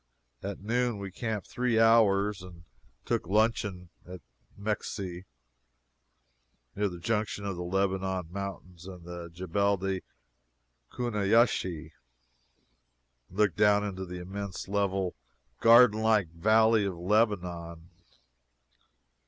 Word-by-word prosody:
At 100 0 -6
noon 120 +2 0
we 100 -1 -6
camped 110 0 -4
three 125 -2 0
hours 105 -3 +4
and 90 -2 -12 0.4
took - - -1
luncheon 105 -3 0
at 90 -1 -10 0.4
Mekseh, 100 -3 -4 1.5
near 105 0 0
the 90 - -8
junction 105 +2 -2
of 100 -2 -3
the 90 - -6
Lebanon 95 -1 -1
Mountains 90 -2 -7
and 90 -2 -10
the 85 -1 -7
Jebel 95 +4 0
el 95 -1 -1 0.9
Kuneiyiseh, 105 -8 +1 1.4
and 95 - -14
looked 105 -6 +2
down 105 0 +4
into 95 -2 -4
the 90 0 -7
immense, 95 +1 -6
level, 95 -2 -1 0.5
garden 115 -1 +6
like 110 -5 +2
Valley 110 +6 +3
of 95 -3 -3
Lebanon. 90 -4 -1
100 Hz, 110 wpm, -29 LUFS, 90-105 Hz, 1.5 s, garden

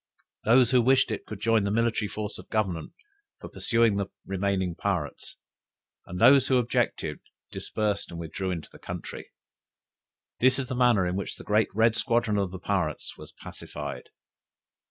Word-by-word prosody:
Those 120 +2 +5
who 125 -1 +5
wished 130 0 +3
it, 110 - -4
could 110 - -7
join 110 0 +2
the 100 - 0
military 115 0 +1
force 105 +1 -5
of - - -13
Government 95 -8 -2 0.5
for - - -9
pursuing 115 -3 +2
the 100 -1 -1 0.2
remaining 95 -2 -1
pirates; 85 -5 -3 0.7
and 90 +1 -6
those 135 +3 +7
who 130 - +3
objected, 125 -1 0 0.3
dispersed 105 -2 -2
and 85 - -7
withdrew 85 +3 -4
into 85 -3 -4
the - - -15
country. - - -7 1.1
"This 130 +1 +4
is 135 -3 -3
the 130 - -2
manner 120 -6 +4
in 90 0 -1
which 100 - -4
the - - -11
great 105 +1 +2
red 110 0 +4
squadron 115 -5 +1
of 100 -2 0
the 95 - -7
pirates 90 -5 -2
was - - -12
pacified." - - -8
105 Hz, 165 wpm, -27 LUFS, 95-115 Hz, 1.1 s, those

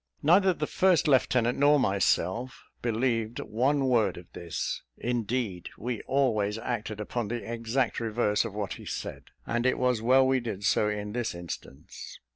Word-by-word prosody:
Neither 185 +5 +5
the 155 -4 -2
first 180 0 +3
lieutenant 125 -3 +2
nor 145 +1 +5
myself 100 +2 0 0.2
believed 115 -1 0
one 135 +5 +1
word 120 -4 +2
of 90 - -13
this; 85 -2 -4 0.2
indeed, 115 -5 -2
we 120 -1 -4
always 110 -7 +1
acted 110 -2 -4
upon 110 +1 -3
the 120 +1 -4
exact 120 +2 -1
reverse 110 -2 +1
of 110 -3 -6
what 105 -2 -3
he - - -11
said; - - -5 0.2
and 120 0 -1
it 130 - +2
was 125 -3 +1
well 130 +3 +5
we 130 0 +3
did 110 -5 -5
so 105 0 +2
in 105 0 -4
this 120 -6 -2
instance. 85 -3 -9
115 Hz, 160 wpm, -28 LUFS, 105-130 Hz, 0.2 s, Neither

